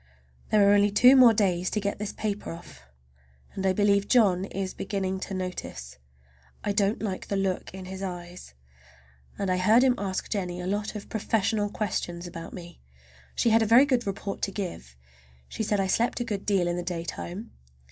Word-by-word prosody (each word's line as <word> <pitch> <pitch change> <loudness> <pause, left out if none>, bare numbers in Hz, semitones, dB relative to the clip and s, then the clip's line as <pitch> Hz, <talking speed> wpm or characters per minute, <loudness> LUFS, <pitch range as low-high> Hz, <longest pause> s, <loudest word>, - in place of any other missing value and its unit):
There 205 -2 +5
are 200 - +6
only 205 0 +4
two 250 +6 +6
more 255 -3 +8
days 185 -5 +1
to 215 - -1
get 200 -1 -3
this 210 -1 -3
paper 210 -1 -4
off, 70 - -12 0.7
and 190 - -4
I - - +4
believe 200 +1 +2
John 195 -7 +3
is 195 -1 -4
beginning 190 -1 -3
to 190 +1 -5
notice. 65 - -6 0.6
I 205 - 0
don't 200 +1 0
like 190 -3 -4
the 200 - -2
look 195 -2 -1
in 190 0 -9
his 190 +1 -7
eyes. 175 - -7 0.8
And 195 -2 -1
I 185 - +1
heard 215 +7 +5
him 260 -1 +5
ask 195 -2 -3
Jennie 180 -4 -3
a 180 - -5
lot 205 +3 -2
of 210 - -7
professional 215 -1 0
questions 175 -4 -3
about 165 -1 -8
me. 175 -2 -11 0.5
She 235 - +2
had 225 +1 +5
a 220 - +2
very 240 +5 +7
good 250 -5 0
report 195 0 -4
to 195 - -1
give. 175 - -6 0.5
She - - -6
said 210 -1 0
I 195 - +1
slept 230 +7 +1
a - - 0
good 205 -4 -5
deal 195 -4 +2
in 175 0 -1
the - - -2
daytime. 175 +4 -5
195 Hz, 195 wpm, -27 LUFS, 180-210 Hz, 0.8 s, more